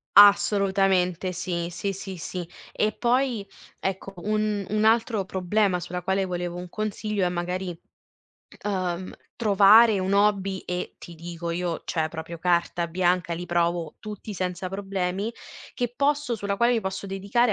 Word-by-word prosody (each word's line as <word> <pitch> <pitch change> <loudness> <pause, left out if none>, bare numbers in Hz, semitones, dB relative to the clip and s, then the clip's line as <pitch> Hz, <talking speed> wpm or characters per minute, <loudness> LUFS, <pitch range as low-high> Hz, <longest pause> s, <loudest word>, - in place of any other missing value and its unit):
Assolutamente 195 -3 +5
sì, 175 -1 -3
sì, 195 +3 -3
sì, 190 -1 -7
sì. 175 +1 -5 0.2
E 215 - +1
poi, 240 -2 0 0.3
ecco, 195 +1 -3
un 210 +1 -1
un 215 +1 +1
altro 225 -2 +3
problema 190 0 +1
sulla 180 +1 -5
quale 190 +1 0
volevo 175 -1 -3
un 180 0 -7
consiglio 210 0 -2
è 180 - +2
magari, 180 0 -3 0.9
ehm, 185 -2 -2 0.2
trovare 210 0 +6
un 190 +1 -1
hobby 200 -1 +2
e 180 0 -4
ti 170 - -10
dico 170 +1 -6
io, 170 0 -2
cioè 160 -2 0
proprio 160 +1 -7
carta 175 0 +1
bianca, 175 0 +1
li 175 +1 -4
provo 170 -2 0
tutti 210 0 -7
senza 180 0 -3
problemi, 195 +2 -2 0.4
che 245 -1 -3
posso 285 -3 +1
sulla 200 -1 -2
quale 235 +2 +4
io 230 - +1
posso 190 +1 -4
dedicare 200 +5 +1
190 Hz, 145 wpm, -26 LUFS, 175-210 Hz, 0.9 s, trovare